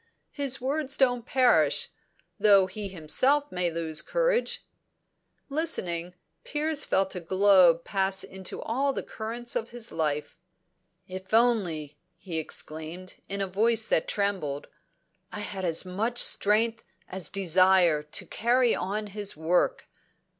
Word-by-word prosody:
His 275 Hz, -2 st, -1 dB
words 275 Hz, +2 st, -2 dB
don't 245 Hz, -3 st, +1 dB
perish, 255 Hz, -2 st, +2 dB, 0.5 s
though 200 Hz, -3 st, +6 dB
he 200 Hz, +2 st, -6 dB
himself 255 Hz, -, +1 dB
may 180 Hz, -1 st, -1 dB
lose 160 Hz, -2 st, -2 dB
courage." -, -, 0 dB, 0.8 s
Listening, 180 Hz, -, -1 dB, 0.3 s
Piers 305 Hz, 0 st, 0 dB
felt 190 Hz, 0 st, 0 dB
a 180 Hz, -, -4 dB
glow 185 Hz, -1 st, +5 dB
pass 190 Hz, +2 st, -1 dB
into 190 Hz, -1 st, -7 dB
all 270 Hz, +5 st, 0 dB
the -, -, -4 dB
currents 235 Hz, +2 st, -6 dB
of 225 Hz, -, -2 dB
his 235 Hz, -1 st, -6 dB
life. 150 Hz, -2 st, -2 dB, 0.7 s
"If 190 Hz, +3 st, -4 dB
only," 175 Hz, -11 st, +1 dB, 0.2 s
he 170 Hz, -2 st, -4 dB
exclaimed, 160 Hz, +4 st, -7 dB
in 200 Hz, 0 st, -2 dB
a 195 Hz, -, -1 dB
voice 220 Hz, +4 st, +1 dB
that 160 Hz, -, +2 dB
trembled, 190 Hz, -9 st, -2 dB, 0.7 s
"I 210 Hz, -, -6 dB
had 195 Hz, -2 st, -5 dB
as 170 Hz, 0 st, +2 dB
much 215 Hz, +7 st, -2 dB
strength 225 Hz, +2 st, +3 dB, 0.2 s
as 185 Hz, -4 st, -2 dB
desire 185 Hz, -3 st, +4 dB
to 150 Hz, +1 st, -4 dB
carry 240 Hz, +2 st, +2 dB
on 210 Hz, +3 st, -3 dB
his 205 Hz, -3 st, -5 dB
work!" 165 Hz, +3 st, 0 dB
195 Hz, 130 wpm, -27 LUFS, 175-235 Hz, 0.8 s, though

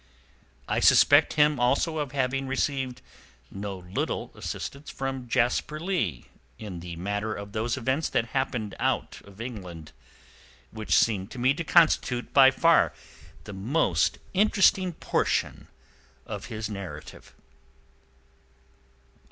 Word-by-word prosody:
I -, -, 0 dB
suspect -, -, +5 dB
him 150 Hz, -2 st, +3 dB
also 140 Hz, +6 st, +1 dB
of 145 Hz, -3 st, -3 dB
having 135 Hz, 0 st, -1 dB
received 130 Hz, -1 st, -2 dB, 0.5 s
no 100 Hz, 0 st, -5 dB
little 90 Hz, 0 st, -4 dB
assistance 140 Hz, +2 st, -6 dB
from 135 Hz, -2 st, -5 dB
Jasper 125 Hz, +6 st, 0 dB
Leigh 155 Hz, -, -2 dB, 0.3 s
in 95 Hz, -5 st, -7 dB
the 85 Hz, 0 st, -7 dB
matter 105 Hz, +5 st, -3 dB
of 100 Hz, 0 st, -8 dB
those 115 Hz, +4 st, -2 dB
events 130 Hz, +5 st, -1 dB
that 115 Hz, 0 st, 0 dB
happened 120 Hz, -6 st, -2 dB
out -, -, -1 dB
of 100 Hz, +1 st, -16 dB
England, 90 Hz, -10 st, -8 dB, 0.8 s
which 110 Hz, -1 st, -1 dB
seem 105 Hz, -5 st, +2 dB
to 125 Hz, -, -11 dB
me 125 Hz, +3 st, +3 dB
to 170 Hz, -, -4 dB
constitute 150 Hz, -7 st, +2 dB
by 135 Hz, -1 st, +8 dB
far 165 Hz, +5 st, +3 dB, 0.5 s
the 105 Hz, -, -9 dB
most 115 Hz, +12 st, +1 dB, 0.2 s
interesting 190 Hz, -2 st, +3 dB
portion -, -, -1 dB, 0.6 s
of 105 Hz, -2 st, -6 dB
his 110 Hz, -2 st, -5 dB
narrative. 100 Hz, -3 st, -9 dB
125 Hz, 120 wpm, -26 LUFS, 105-140 Hz, 0.8 s, by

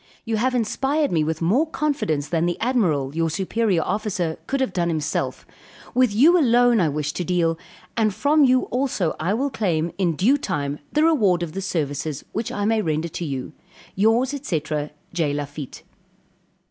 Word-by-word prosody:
You 225 Hz, -1 st, -1 dB
have 255 Hz, +3 st, +1 dB
inspired 270 Hz, +6 st, 0 dB
me 160 Hz, -3 st, +2 dB
with 160 Hz, +1 st, -2 dB
more 245 Hz, -, +3 dB
confidence 275 Hz, -, -1 dB
than 170 Hz, 0 st, +1 dB
the 175 Hz, -, -2 dB
admiral, 170 Hz, -, +1 dB
your 165 Hz, 0 st, +1 dB
superior 190 Hz, +1 st, 0 dB
officer, 190 Hz, -5 st, -2 dB
could 275 Hz, -, -1 dB
have 260 Hz, -8 st, -1 dB
done 175 Hz, -1 st, 0 dB
himself; 155 Hz, -2 st, -2 dB, 0.5 s
with 255 Hz, -3 st, +3 dB
you 305 Hz, -, +5 dB
alone, 245 Hz, -4 st, +4 dB
I 165 Hz, -4 st, +3 dB
wish 150 Hz, +1 st, -2 dB
to 180 Hz, -, -3 dB
deal, 170 Hz, -2 st, 0 dB, 0.4 s
and 220 Hz, -2 st, +2 dB
from 290 Hz, +8 st, +3 dB
you 255 Hz, -1 st, +4 dB
also 245 Hz, -, 0 dB
I 180 Hz, +6 st, 0 dB
will 275 Hz, +4 st, -1 dB
claim, 175 Hz, -8 st, 0 dB
in 175 Hz, -4 st, +1 dB
due 255 Hz, -, +3 dB
time 145 Hz, -, -3 dB
the 300 Hz, -, +2 dB
reward 210 Hz, -, +3 dB
of 165 Hz, -, -4 dB
the 195 Hz, -, -4 dB
services, 150 Hz, -5 st, -3 dB
which 220 Hz, +1 st, -3 dB
I 205 Hz, -, -2 dB
may 220 Hz, 0 st, +2 dB
render 160 Hz, -2 st, -1 dB
to 170 Hz, -, -5 dB
you. 135 Hz, 0 st, -5 dB, 0.4 s
Yours, 225 Hz, +7 st, +2 dB
&c. 165 Hz, -, -2 dB, 0.5 s
J. 160 Hz, -5 st, 0 dB
LAFITTE. 145 Hz, -1 st, -6 dB
190 Hz, 175 wpm, -23 LUFS, 160-245 Hz, 0.5 s, you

